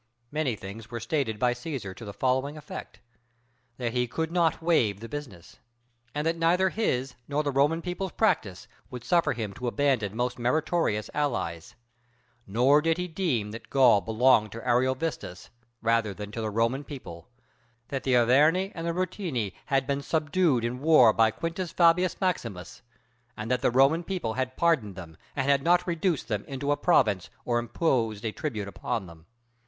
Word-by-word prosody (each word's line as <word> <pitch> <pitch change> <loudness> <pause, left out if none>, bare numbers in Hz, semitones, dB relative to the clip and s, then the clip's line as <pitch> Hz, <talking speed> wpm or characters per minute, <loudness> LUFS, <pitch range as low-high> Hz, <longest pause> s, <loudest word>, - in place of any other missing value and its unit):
Many 150 -6 0
things 105 +3 -9
were 120 0 -5
stated 115 -2 -1
by 125 +2 +2
Cæsar 125 - -6
to 115 - -10
the 100 - -6
following 130 +6 0
effect: 150 - -9 0.8
"That 120 -2 -2
he 125 -1 +1
could 160 +7 -3
not 170 -2 +2
waive 140 - +2
the 115 - -8
business, 120 - -9 0.6
and 150 +1 -1
that 165 +1 0
neither 180 +3 +3
his 135 - -1
nor 145 +1 0
the 145 - -1
Roman 145 +5 +2
people's 180 +1 -4
practice 160 - 0 0.2
would 125 -2 -8
suffer 170 -3 +2
him 110 -4 -4
to 125 +4 -5
abandon 120 -6 0
most 125 +1 -2
meritorious 125 -3 0
allies; 85 - -2 0.7
nor 125 +8 +4
did 165 +1 +1
he 180 0 -2
deem 155 - -1
that 115 - -10
Gaul 125 -7 +5
belonged 110 -1 +3
to 115 +2 -8
Ariovistus 125 - -1 0.3
rather 115 -3 +1
than 105 +1 -7
to 115 - -5
the 110 - -2
Roman 115 +6 0
people; 85 - -10 0.6
that 135 -2 -3
the 130 -2 +1
Arverni 150 - +4
and 165 -1 -5
the 170 - 0
Ruteni 170 - -2
had 135 -1 +1
been 140 0 -1
subdued 150 -4 +1
in 125 +2 -3
war 145 -8 +6
by 115 -1 +4
Quintus 165 - -4
Fabius 175 +1 +3
Maximus, 115 - -3 0.6
and 110 +3 -4
that 125 - +1
the - - +3
Roman 135 +7 +4
people 170 -12 -3
had 130 +1 -3
pardoned 140 - +1
them 85 -4 -10 0.2
and 135 -2 -1
had 140 -1 +4
not 175 +4 +3
reduced 170 -2 -1
them 105 -3 -2
into 140 +1 -3
a - - +3
province 115 - +2 0.2
or 120 -1 +1
imposed 120 -4 -1
a 110 - -1
tribute 110 -8 -4
upon 100 +1 -3
them. 85 -1 -15
130 Hz, 175 wpm, -27 LUFS, 110-160 Hz, 0.8 s, war